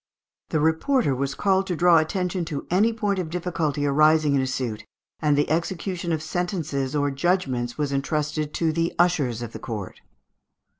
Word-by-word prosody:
The 155 - +1
reporter 160 - +2
was 135 +1 -2
ordered 190 -1 +1
to 180 - -1
draw 170 0 +5
attention 180 +2 -1
to 155 -4 -5
any 205 +6 +4
point 205 -4 -1
of 175 -3 -3
difficulty 160 -4 -1
arising 155 +1 +4
in 135 - +3
a 130 - -1
suit, 120 -4 -3 0.4
and 150 -2 +2
the 145 - +2
execution 170 +2 -2
of 155 -1 -1
sentences 155 -6 -2
or 145 -1 +1
judgments 135 -6 0
was 145 -2 -1
entrusted 150 +2 -1
to 160 -2 +1
the 165 +1 -1
ushers 145 -10 +1
of 115 - -6
the - - -8
court. 105 -5 -6
155 Hz, 170 wpm, -24 LUFS, 140-180 Hz, 0.4 s, draw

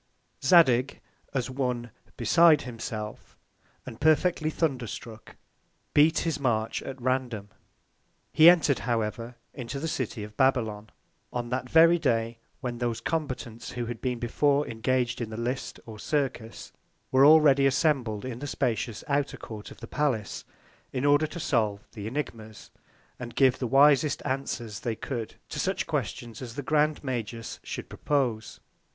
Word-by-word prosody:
Zadig, 135 -7 +4 0.3
as 130 -1 -2
one 125 -3 -2 0.3
beside 165 -2 +5
himself, 110 -3 -7 0.5
and 115 - -10
perfectly 155 +1 +3
thunder 140 -7 -1
struck, 110 +1 -9 0.6
beat 155 +3 +5
his 160 -3 -1
March 115 -5 0
at 135 0 -7
random. 125 -5 -2 0.8
He 160 +2 +9
entred, 160 -6 +4
however, 115 0 -2 0.2
into 130 +2 -5
the 160 - -3
City 125 -8 -3
of 105 0 -10
Babylon, 110 -5 +1 0.4
on 120 -1 -3
that 125 0 -3
very 165 +3 +6
Day, 115 -4 0 0.2
when 120 -3 -4
those 120 -2 -1
Combatants 125 -6 -4
who 120 -1 -3
had 115 -1 -6
been 125 -2 -1
before 140 +5 +1
engag'd 120 +2 -1
in 115 - -3
the 110 - -7
List 125 +3 -3
or 110 -2 -10
Circus, 130 -6 -3 0.4
were 130 +1 +5
already 145 -2 +7
assembled 130 -6 +1
in 125 -2 -5
the 145 - -5
spacious 115 -4 -2
Outer 145 -1 0
Court 105 -2 -9
of - - -14
the 115 - -7
Palace, 130 -9 -2 0.5
in 130 +1 -2
order 145 +2 +4
to 170 - -8
solve 110 -9 0
the 105 -2 -6
Ænigmas, 115 -5 -6 0.5
and 120 -2 -7
give 130 -2 +4
the 125 - -1
wisest 140 +3 +4
Answers 125 -6 -3
they 115 -2 -3
could 115 -2 -5
to - - -5
such - - -1
Questions, 115 -1 -4
as 120 -2 -7
the 145 - -4
Grand 150 +2 +1
Magus 115 -3 -4
should - - -6
propose. 125 -7 -2
125 Hz, 150 wpm, -27 LUFS, 115-145 Hz, 0.8 s, He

